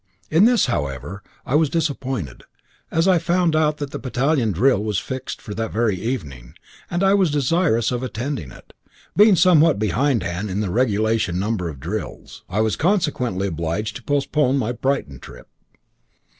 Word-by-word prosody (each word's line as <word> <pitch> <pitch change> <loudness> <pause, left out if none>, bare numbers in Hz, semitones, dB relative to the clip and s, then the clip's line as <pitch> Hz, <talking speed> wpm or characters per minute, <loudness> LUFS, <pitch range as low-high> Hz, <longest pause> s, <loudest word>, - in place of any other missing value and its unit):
In 165 +7 +5
this, 240 0 +4
however, 75 - -3 0.2
I - - -4
was 155 0 +3
disappointed, 135 - -3 0.5
as 165 +3 +1
I 185 -3 +4
found 175 0 +1
that 150 -2 0
a - - -4
battalion 130 -2 0
drill 105 +3 +2
was 105 -3 -1
fixed 130 +11 -5
for 105 - -8
that 110 +1 -3
very 110 -3 +1
evening, 75 - -5 0.3
and 175 +2 -1
I 195 0 +4
was 195 -4 +3
desirous 145 - +1
of 125 -1 -2
attending 130 - -4
it, - - -16 0.4
being 210 -1 +6
somewhat 165 - +5
behindhand 105 -3 0
in 95 +2 -2
the 100 -4 -2
regulation 110 -4 +1
number 100 -4 -2
of 70 -4 -9
drills. 90 +10 -6
I 100 +4 0
was 110 -1 +1
consequently 150 - 0
obliged 85 +5 -3
to - - -14
postpone 145 -1 +1
my 120 -3 -1
Brighton 125 - -2
trip. - - -13
125 Hz, 160 wpm, -21 LUFS, 100-150 Hz, 0.5 s, being